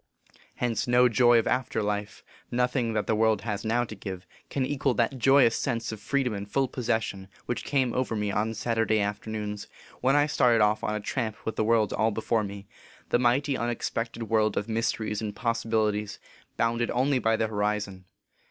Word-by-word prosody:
Hence, 120 -3 -1
no 125 +1 +5
joy 120 +1 +5
of 115 - +2
after 125 -4 0
life 105 0 -3 0.3
nothing 125 -1 0
that 110 - 0
the - - +1
world 110 -1 +2
has 105 -1 -3
now 115 +2 +1
to 110 - -7
give 95 -2 -7 0.2
can 135 -2 -1
equal 135 -2 0
that 120 +4 0
joyous 135 -2 +5
sense 115 -4 -2
of 110 - -7
freedom 130 +2 0
and 100 0 -6
full 135 +4 +1
possession 110 -6 -2 0.2
which 120 - -3
came 130 -4 +1
over 125 -3 -1
me 105 -1 -1
on 110 +3 -1
Saturday 115 0 +1
afternoons, 105 0 -3 0.3
when 135 +2 +3
I 145 0 +5
started 125 -5 +3
off 105 0 +2
on 105 - -1
a - - -2
tramp 110 -1 -3
with 110 - -2
the - - +1
world 110 -2 +2
all 110 - +2
before 110 +1 0
me, 100 0 -7 0.4
the 120 - +3
mighty, 130 +4 +2
unex 120 -2 -2
plored 115 0 -3
world 110 -1 +1
of 105 - -1
mysteries 110 -1 -1
and 105 -2 -4
possibilities, 110 -3 -1 0.4
bounded 115 +1 +1
only 130 +2 +2
by 115 -1 +2
the 110 - 0
horizon. 105 -3 -2
115 Hz, 190 wpm, -27 LUFS, 105-120 Hz, 0.4 s, no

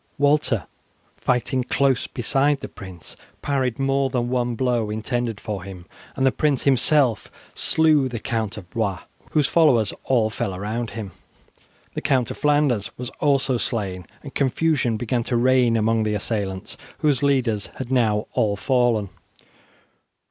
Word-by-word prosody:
Walter, 140 - +2 0.5
fighting 125 +1 0
close 135 0 +1
beside 135 +4 +1
the - - -5
prince, 95 -3 -11 0.3
parried 130 -4 0
more 135 0 +1
than 120 -2 -1
one 125 -1 0
blow 120 -3 0
intended 115 0 -2
for 105 -4 -4
him, 90 -2 -9 0.3
and 135 - +1
the 130 - +5
prince 145 -1 0
himself 135 -3 +2 0.2
slew 155 -4 +3
the 120 - -4
Count 110 -2 -3
of 95 -4 -9
Blois, 100 -5 -1 0.3
whose 150 -2 +3
followers 135 -10 +3
all 115 -4 +2
fell 110 -4 -3
around 110 +4 -3
him. 105 -4 -5 0.8
The - - -4
Count 130 -5 +1
of - - -8
Flanders 145 -8 +2
was 125 0 -6
also 135 -3 +2
slain, 95 -7 -2 0.2
and 140 - -9
confusion 135 -3 +1
began 120 +1 -1
to 120 - 0
reign 125 -1 +3
among 110 +1 +2
the 105 -1 0
assailants, 100 -3 -3 0.2
whose 145 -5 +2
leaders 125 -7 +1
had 130 -1 -6
now 110 -5 +2
all 105 -2 +1
fallen. 120 -3 +1
120 Hz, 150 wpm, -23 LUFS, 110-135 Hz, 0.8 s, the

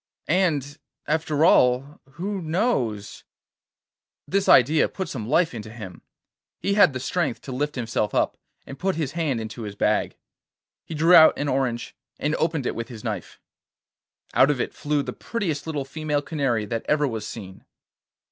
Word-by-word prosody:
And, 155 -5 +1 0.3
after 155 0 +1
all, 130 -1 +3
who 195 +5 -4
knows?' 155 - -1 1.0
This 195 0 0
idea 150 +5 +5
put 190 -2 -5
some 115 -8 -5
life 165 +2 +3
into 110 -2 -7
him. 105 -6 -9 0.6
He 200 - 0
had 200 -7 +5
the 130 - -3
strength 145 -1 -1
to 135 - -8
lift 145 +4 -2
himself 115 -4 -2
up - - +1 0.3
and 135 - -10
put 190 0 0
his 155 -4 -2
hand 150 -6 -1
into 110 +1 -6
his 105 -2 -6
bag. 105 +1 0 0.7
He 160 - -7
drew 165 +4 +4
out 160 -2 +8
an 145 - -2
orange 130 -3 -1 0.2
and 150 - -1
opened 160 -4 0
it - - -1
with 115 - -5
his 115 -4 -10
knife. 105 -7 -5 0.9
Out 135 - +5
of 145 -3 0
it - - -2
flew 145 -1 -1
the - - -5
prettiest 170 -10 -3
little 145 -4 -2
female 150 0 -2
canary 135 -9 -1
that 115 +2 -3
ever 150 -1 +3
was 115 -4 -4
seen. 95 -4 -9
145 Hz, 165 wpm, -24 LUFS, 120-160 Hz, 1.0 s, out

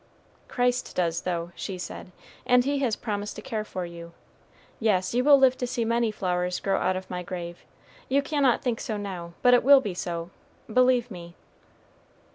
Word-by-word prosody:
"Christ 245 0 0
does, 170 -2 0
though," 175 -1 -3
she 190 - -5
said; 180 0 -8 0.4
"and 250 0 +5
He 280 0 0
has 245 -6 +1
promised 205 -2 -4
to - - -7
care 215 -2 -3
for 185 -4 -5
you. 170 0 -10 0.7
Yes, 190 -4 +1
you 250 +1 +2
will 285 0 +7
live 265 -1 +5
to 250 - -1
see 240 -2 -1
many 230 0 +1
flowers 180 -3 -1
grow 195 -1 0
out 185 - +1
of 185 0 -5
my 180 0 -4
grave. 175 -1 -7 0.5
You 275 +2 +2
cannot 280 -4 +1
think 240 -3 -1
so 215 - -3
now; 180 -4 -6
but 250 - +6
it 245 - +6
will 280 +2 +8
be 210 -8 -4
so 170 -1 -4 0.4
believe 250 +1 +3
me." 170 -2 -9
210 Hz, 185 wpm, -26 LUFS, 180-250 Hz, 0.7 s, will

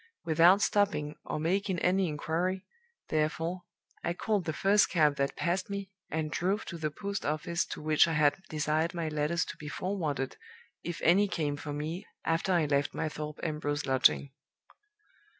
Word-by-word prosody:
Without 170 +5 +5
stopping, 195 -8 +1
or - - -3
making 190 +4 0
any 185 +2 +2
inquiry, 170 +5 -2 0.4
therefore, 165 +3 -1 0.4
I 170 - 0
called 205 -1 0
the 160 - 0
first 200 +5 +3
cab 150 -4 +3
that 140 0 0
passed 180 +3 -1
me, 200 -1 -5 0.2
and 155 -1 -2
drove 195 +6 0
to 170 - -6
the 155 -1 -1
post 200 +5 -4
office 155 +3 0
to - - -7
which 155 +1 +5
I 165 - -1
had 150 +3 +3
desired 155 +3 0
my 165 -2 -1
letters 155 +3 0
to - - -8
be 150 - -8
forwarded 150 -5 -2 0.5
if 170 -1 -5
any 195 +5 +5
came 150 -6 -1
for 145 0 -6
me 155 +6 -4 0.2
after 165 +3 +1
I 170 -4 +3
left 145 0 0
my 160 - -1
Thorpe 150 0 -6
Ambrose 150 -2 -2
lodging. 135 +1 +3
160 Hz, 170 wpm, -30 LUFS, 150-185 Hz, 0.5 s, Without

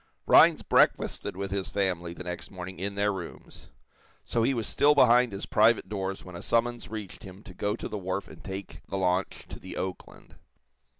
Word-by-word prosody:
Rhinds - - +6
breakfasted - - +2
with 100 0 -4
his 100 -1 -2
family, 90 -3 -1
the 90 - -8
next 90 -1 -6
morning, 90 -1 -8
in 100 +2 -3
their 100 0 +1
rooms. 95 -3 -9 0.6
So 115 - 0
he 130 +4 +2
was 115 -2 -2
still 150 +1 +3
behind 125 -3 +5
his 100 +1 -5
private 110 -2 +3
doors 95 -2 -4
when 90 -1 -10
a 85 - -7
summons 120 -1 0
reached 105 -5 -7
him 95 +2 -12
to 90 - -12
go 105 +3 -1
to - - -6
the 105 - -5
wharf 95 +1 -3
and - - -13
take 95 0 -7
the 95 - -2
launch 90 0 -1
to - - -8
the - - -9
"Oakland." 95 -1 -7
100 Hz, 195 wpm, -28 LUFS, 95-110 Hz, 0.6 s, Rhinds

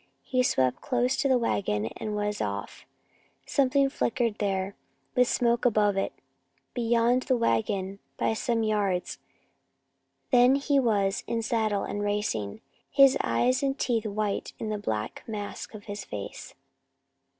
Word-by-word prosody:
He 255 -1 +1
swept 130 - +1
close 250 0 +1
to 275 - +1
the 260 -2 +4
wagon 190 - 0
and 215 -1 -4
was 210 0 -2
off. 100 0 -4 0.6
Something 275 0 +3
flickered 235 -4 -1
there, 195 -1 -1 0.4
with 250 -1 +4
smoke 235 -1 +1
above 210 -4 +3
it, 195 - 0 0.6
beyond 235 +1 +2
the 255 -1 +1
wagon 190 - 0 0.2
by - - +1
some 230 0 0
yards. 205 -4 0 1.1
Then 250 +1 +6
he 280 0 +2
was 200 -6 +1
in 230 -1 -1
saddle 215 -3 0
and 205 - -3
racing 205 - -1
again, - - -12 0.3
his 275 -2 +6
eyes 255 +1 +2
and 275 0 0
teeth 230 -3 0
white 210 -1 -2
in 220 - -4
the 210 -1 -2
black 110 - -3
mask 210 0 -6
of 205 - -9
his 205 -1 -6
face. 100 -1 -7
215 Hz, 145 wpm, -27 LUFS, 200-245 Hz, 1.1 s, Then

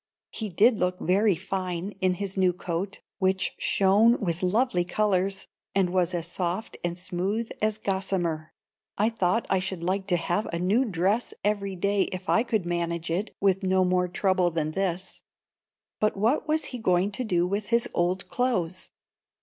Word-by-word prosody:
He 220 -2 -4
did 215 +5 +4
look 180 0 0
very 195 +3 +3
fine 185 0 -3
in 185 -1 +2
his 195 +1 -4
new 185 -2 +3
coat, 180 +3 -4 0.2
which 190 0 +1
shone 205 +5 +4
with 175 -5 -2
lovely 185 0 +2
colours, 195 0 0 0.3
and 190 -2 +2
was 180 -1 +1
as 170 -2 -2
soft 175 +4 -3
and 175 0 -2
smooth 190 +5 -2
as 215 0 +1
gossamer. 190 -6 -2 0.5
I 215 +2 +3
thought 225 0 0
I 190 - +2
should 185 -2 -4
like 190 +2 -1
to 180 -3 +2
have 175 +5 -1
a 170 - -2
new 200 +9 +2
dress 200 +3 0
every 200 -1 0
day 200 +2 +1
if 185 0 -6
I 225 - +4
could 220 -6 -1
manage 170 -1 -2
it 190 +6 -2
with 195 -1 +2
no 190 -1 +2
more 180 0 +2
trouble 180 0 +1
than 160 -2 -2
this. 185 +1 -2 0.8
But 215 -1 +1
what 235 +10 +1
was 310 +1 +1
he 250 - -4
going 185 -1 +2
to 255 - -3
do 175 -6 +1
with 200 +2 -2
his 235 +1 +2
old 180 +2 0
clothes? 185 -9 -1
190 Hz, 175 wpm, -26 LUFS, 175-205 Hz, 0.8 s, did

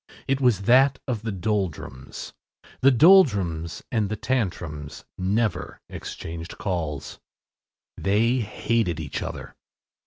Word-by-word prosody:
It 135 0 +1
was 115 -7 +3
that 130 +4 +5
of 120 -5 -2
the 110 -1 -3
Doldrums. 95 -9 -3 0.5
The 135 - +6
Doldrums 100 - +4
and 110 -4 +1
the 110 - -1
Tantrums 85 - -3
never 100 0 -1
exchanged 85 +1 -7
calls. 80 -7 -3 0.8
They 110 +6 +2
hated 110 -4 0
each - - -4
other. - - -6
105 Hz, 105 wpm, -25 LUFS, 85-120 Hz, 0.8 s, The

